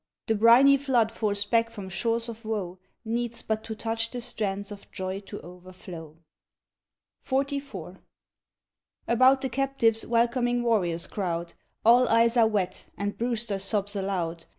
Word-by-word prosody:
The 225 - +1
briny 235 +6 +6
flood 250 -5 +1
forced 205 -2 -2
back 230 -1 +3
from 205 -4 -8
shores 230 +5 -1
of 230 0 -8
woe, 195 -5 -4 0.3
Needs 235 +1 -2
but 220 0 -2
to 220 - -5
touch 225 +1 -2
the 245 - -5
strands 200 -3 -3
of 205 -1 -10
joy 190 +1 -4
to 205 +1 -9
overflow. 175 -3 -11 1.1
XLV. 270 - -3 1.1
About 255 +3 +5
the 265 - -1
captives 265 -5 +1
welcoming 240 +1 +1
warriors 180 -8 +1
crowd, 170 -4 -3 0.3
All 245 +2 +6
eyes 230 +1 +4
are 230 -2 +5
wet, 195 -4 -2
and 205 0 -2
Brewster 230 -4 -2
sobs 205 +1 -1
aloud. 175 -4 -3
220 Hz, 140 wpm, -27 LUFS, 195-235 Hz, 1.1 s, briny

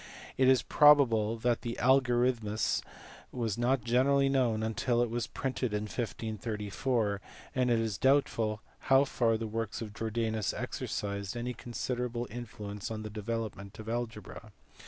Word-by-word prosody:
It 130 - +3
is 130 -1 +5
probable 120 -7 +5
that 120 +1 0
the 120 -1 -4
Alyorithmus 120 -4 +2 0.5
was 115 -5 -2
not 125 +1 +1
generally 135 +4 +3
known 120 -5 +1
until 120 +2 +1
it 120 - -3
was 120 0 -2
printed 125 -4 -2
in 105 - -1
1534, 110 0 -2 0.3
and 125 -1 +1
it 120 - +4
is 110 -4 -1
doubtful 115 -6 +2 0.3
how 135 +1 +6
far 115 -4 +1
the 115 - -4
works 110 -1 -3
of 110 -2 -6
Jordanus 110 -1 -1
exercised 100 +2 -3
any 125 +1 -3
considerable 120 0 -3
influence 105 -3 -6
on 110 -1 -5
the 110 - -6
development 105 -2 -4
of 110 -1 -9
algebra. 110 -2 -5
115 Hz, 140 wpm, -31 LUFS, 110-125 Hz, 0.5 s, how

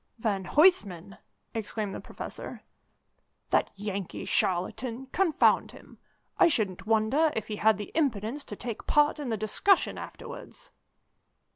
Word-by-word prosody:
"Van 205 -4 -1
Huysman!" 200 - +2 0.3
exclaimed 215 -2 -3
the - - -5
Professor. - - -8 0.9
"That - - +3
Yankee 200 -2 -5
charlatan, 225 +8 0
confound 360 -5 +3
him! - - -15 0.4
I - - +7
shouldn't 215 - -1
wonder 225 +9 +3
if 220 -1 -3
he 210 - -3
had 220 -1 +4
the 205 - -7
impudence 270 -3 -1
to 210 - -7
take 235 0 -6
part 295 +1 +3
in 285 -4 -4
the 220 - -1
discussion 215 - +2
afterwards." - - -10
220 Hz, 130 wpm, -28 LUFS, 200-290 Hz, 0.9 s, I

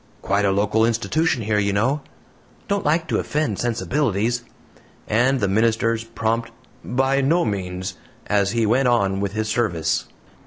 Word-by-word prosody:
"Quite 100 +1 +1
a 100 - +3
local 105 +3 +2
institution 120 +4 +1
here, 105 0 +1
you 100 -1 +1
know." 130 +9 +1 0.7
"Don't 200 0 0
like 160 +1 +1
to - - +1
offend 150 -10 -1
sensibilities;" 120 -1 0 0.6
and 125 +5 +2
the 100 - +1
minister's 115 +2 +1
prompt 115 0 -2 0.3
"By 135 +2 +1
no 160 +4 +2
means," 95 -3 -4 0.3
as 100 -1 +2
he 115 +1 +1
went 125 +5 +3
on 100 -5 +2
with 100 0 -2
his 110 0 -2
service. 85 -9 0
115 Hz, 150 wpm, -22 LUFS, 100-125 Hz, 0.7 s, a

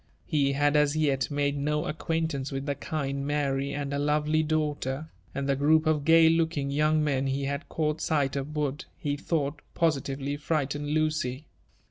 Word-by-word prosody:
0e 140 -2 +3
bad 145 +1 +2
as 150 0 +3
yet 140 -4 +1
made 145 0 0
no 150 +1 -1
acquaintance 160 -3 -2
with 135 0 -3
the 145 - 0
kind 140 -1 -3
Afary 140 -1 0
and 140 0 -3
her 140 - 0
lovely 150 +1 +2
daughter; 150 -1 -2 0.2
and 140 0 -2
the 140 - +2
group 155 +3 +3
of 155 -2 +2
gay 165 0 +7
looking 160 -4 +1
young 155 +2 +2
men 135 -2 0
he 135 +1 -1
had 140 +3 -3
caught 155 -1 -1
sight 145 -3 +1
of 140 +2 -4
would, 145 -1 -2 0.2
be 145 -2 0
thought, 145 -1 -2
positively 140 -3 0
frighten 145 -1 -1
J.ucy. 155 -3 0
145 Hz, 170 wpm, -28 LUFS, 140-155 Hz, 0.2 s, gay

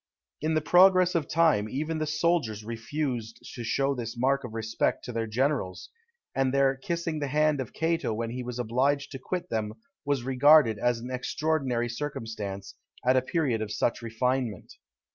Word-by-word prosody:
In 155 +1 0
the 155 - +2
progress 185 +2 +5
of 165 -4 0
time 150 -10 +3
even 155 +5 -2
the 155 - -1
soldiers 150 -9 0
refused 115 0 -3 0.2
to 120 - -6
show 135 +4 +1
this 120 -2 -5
mark 135 +3 +1
of 115 -2 -7
respect 110 0 -1
to 125 - -5
their 115 -1 -2
generals; 125 -4 -1 0.4
and 135 -1 +1
their 135 0 +3
kissing 170 +2 -3
the 145 - -2
hand 150 0 +2
of 125 - -6
Cato 165 -5 0
when 115 +1 -3
he 125 +1 -4
was 125 -1 -5
obliged 130 +5 0
to 135 - -6
quit 180 +7 -4
them 110 -2 -1 0.3
was 140 -4 0
regarded 130 -3 +5
as 120 +1 +1
an 120 +2 -7
extraordinary 130 -2 -1
circumstance, 110 -7 -5 0.3
at 130 +1 +4
a 130 - +4
period 130 -5 0
of 110 -1 -4
such 115 +2 0
refinement. 115 -1 -2
130 Hz, 175 wpm, -28 LUFS, 115-150 Hz, 0.4 s, progress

